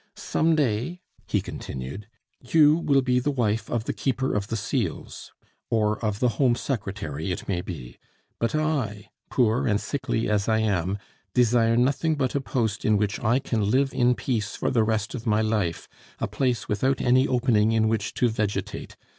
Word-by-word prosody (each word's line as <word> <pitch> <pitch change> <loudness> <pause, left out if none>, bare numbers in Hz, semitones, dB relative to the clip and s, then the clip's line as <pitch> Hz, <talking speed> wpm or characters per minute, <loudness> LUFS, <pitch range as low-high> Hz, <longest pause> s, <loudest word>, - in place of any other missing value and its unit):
Some 160 0 +1
day," 135 +4 0 0.3
he - - +1
continued, 65 +11 -7 0.3
"you 150 +3 +5
will 140 -5 +2
be 125 -1 +2
the 125 - -1
wife 115 -5 0
of 120 -2 -1
the - - -3
Keeper 130 0 -1
of 100 -1 -1
the 115 - -3
Seals, 110 - -3 0.4
or 110 0 +1
of 105 -2 -1
the 125 - +3
Home 125 -3 +4
Secretary, 95 - -3
it 90 - -5
may 90 -3 -1
be; 70 -10 -8 0.4
but 115 +5 0
I, 140 -10 -1 0.2
poor 125 +2 +2
and 105 -3 +2
sickly 130 -4 -2
as 105 0 +1
I 110 - +3
am, 100 -3 0 0.4
desire 115 -1 +4
nothing 140 +6 +2
but 130 -3 -1
a 140 - 0
post 110 -3 -1
in 110 -1 +3
which 100 0 -1
I 120 +2 +3
can 110 -6 -1
live 135 +3 +2
in 125 -1 +3
peace 110 -6 -2
for - - -1
the 115 -3 +3
rest 110 -1 -1
of 120 -2 -6
my 110 0 +3
life, 105 -6 -1 0.3
a - - -2
place 125 -3 -1
without 130 +6 +1
any 130 +2 +3
opening 120 -4 +2
in 110 -1 +3
which 110 -2 -1
to 125 - +3
vegetate. 105 -4 -3
115 Hz, 180 wpm, -25 LUFS, 105-130 Hz, 0.4 s, you